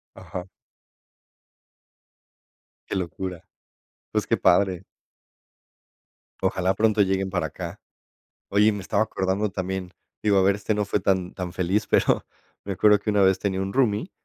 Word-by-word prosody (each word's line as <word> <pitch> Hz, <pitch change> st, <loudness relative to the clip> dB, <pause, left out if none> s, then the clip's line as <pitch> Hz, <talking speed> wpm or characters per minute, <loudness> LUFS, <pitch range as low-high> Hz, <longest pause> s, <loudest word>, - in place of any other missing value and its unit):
Ajá. 90 Hz, 0 st, -7 dB, 2.4 s
Qué -, -, -3 dB
locura. 90 Hz, -1 st, -4 dB, 0.7 s
Pues, -, -, 0 dB
qué -, -, +2 dB
padre. 90 Hz, 0 st, +3 dB, 1.6 s
Ojalá 95 Hz, 0 st, +1 dB
pronto 110 Hz, 0 st, +2 dB
lleguen 95 Hz, 0 st, +1 dB
para 90 Hz, -2 st, -1 dB
acá. -, -, -7 dB, 0.7 s
Oye, 105 Hz, +2 st, +4 dB
me 105 Hz, -, -4 dB
estaba 100 Hz, +3 st, +1 dB
acordando 95 Hz, 0 st, -1 dB
también, 95 Hz, -1 st, -4 dB, 0.3 s
digo, 105 Hz, -2 st, +3 dB
a -, -, +4 dB
ver, 100 Hz, +1 st, +3 dB
este 105 Hz, +1 st, -1 dB
no 105 Hz, -, 0 dB
fue 100 Hz, +1 st, 0 dB
tan 95 Hz, -1 st, 0 dB
tan 90 Hz, -2 st, -5 dB
feliz, 95 Hz, +3 st, 0 dB
pero -, -, +2 dB, 0.4 s
me 100 Hz, -, -3 dB
acuerdo 105 Hz, +2 st, +5 dB
que 105 Hz, -, -2 dB
una 105 Hz, -1 st, +3 dB
vez 95 Hz, -1 st, +4 dB
tenía 95 Hz, -1 st, -1 dB
un 95 Hz, -, -3 dB
roomie, 125 Hz, -, +1 dB
95 Hz, 145 wpm, -25 LUFS, 95-105 Hz, 2.4 s, acuerdo